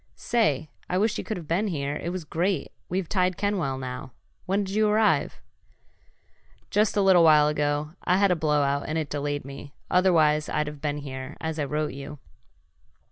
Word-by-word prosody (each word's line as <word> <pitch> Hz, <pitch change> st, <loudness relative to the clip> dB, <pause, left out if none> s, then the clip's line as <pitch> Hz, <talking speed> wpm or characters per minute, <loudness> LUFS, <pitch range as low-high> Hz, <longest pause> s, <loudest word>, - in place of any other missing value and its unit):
"Say, 155 Hz, -, 0 dB, 0.2 s
I 180 Hz, -, 0 dB
wish 215 Hz, +3 st, +1 dB
you -, -, -3 dB
could 215 Hz, -, -4 dB
have 165 Hz, -4 st, -9 dB
been 185 Hz, +7 st, +1 dB
here. 145 Hz, -5 st, -2 dB
It 170 Hz, -, -4 dB
was 180 Hz, -1 st, -4 dB
great! 170 Hz, +2 st, -1 dB, 0.2 s
We've 185 Hz, -1 st, -1 dB
tied 185 Hz, -1 st, +1 dB
Kenwell 185 Hz, -10 st, -1 dB
now. 130 Hz, 0 st, -6 dB, 0.3 s
When'd 195 Hz, +1 st, 0 dB
you 215 Hz, +1 st, +2 dB
arrive?" 215 Hz, 0 st, +2 dB, 1.3 s
"Just 210 Hz, 0 st, +2 dB
a 200 Hz, -, +4 dB
little 185 Hz, -3 st, +6 dB
while 150 Hz, -2 st, +6 dB
ago. 150 Hz, 0 st, 0 dB
I 180 Hz, -, +3 dB
had 200 Hz, -1 st, +4 dB
a -, -, +3 dB
blowout 145 Hz, -3 st, +1 dB
and 155 Hz, -, -1 dB
it 155 Hz, -3 st, -3 dB
delayed 145 Hz, -1 st, -2 dB
me, 140 Hz, +1 st, -10 dB, 0.2 s
otherwise 160 Hz, -5 st, +3 dB
I'd 150 Hz, -, 0 dB
have 150 Hz, -1 st, -8 dB
been 150 Hz, -1 st, -1 dB
here, 130 Hz, -2 st, -7 dB
as 160 Hz, -1 st, -4 dB
I 145 Hz, -, 0 dB
wrote 150 Hz, +2 st, -2 dB
you." 140 Hz, +2 st, -8 dB
155 Hz, 185 wpm, -26 LUFS, 145-185 Hz, 1.3 s, little